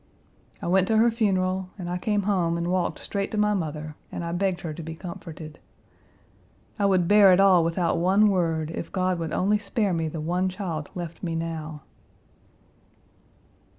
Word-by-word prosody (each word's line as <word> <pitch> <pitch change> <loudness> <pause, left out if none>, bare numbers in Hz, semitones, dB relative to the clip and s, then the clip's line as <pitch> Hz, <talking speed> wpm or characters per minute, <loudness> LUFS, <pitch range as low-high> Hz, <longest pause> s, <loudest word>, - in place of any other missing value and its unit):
I - - -3
went 185 +1 +3
to 220 - +2
her 230 +2 +5
funeral, 190 -4 0
and 180 -3 -6
I 180 +1 -2
came 205 +1 0
home 180 -4 +1
and 170 +1 -2
walked 180 -2 0
straight 200 -1 -3
to - - -1
my 210 0 +3
mother 155 -4 -4 0.2
and - - -5
I 170 - -3
begged 180 0 -1
her 160 -3 -5
to 165 - -8
be 160 0 -7
comforted; 160 -3 -9 1.2
I 200 - +3
would 185 -3 +2
bear 205 -1 +7
it 180 - +5
all 190 -3 +6
without 170 +1 0
one 195 +5 +4
word 165 -4 0
if - - -6
God 185 -2 0
would 165 -2 -3
only 205 +5 +1
spare 205 -2 -1
me 165 -1 -1
the 155 +1 -5
one 180 +4 0
child 175 -5 -5
left 170 -2 -6
me 165 -3 -3
now." 160 -2 -5
180 Hz, 185 wpm, -25 LUFS, 165-195 Hz, 1.2 s, bear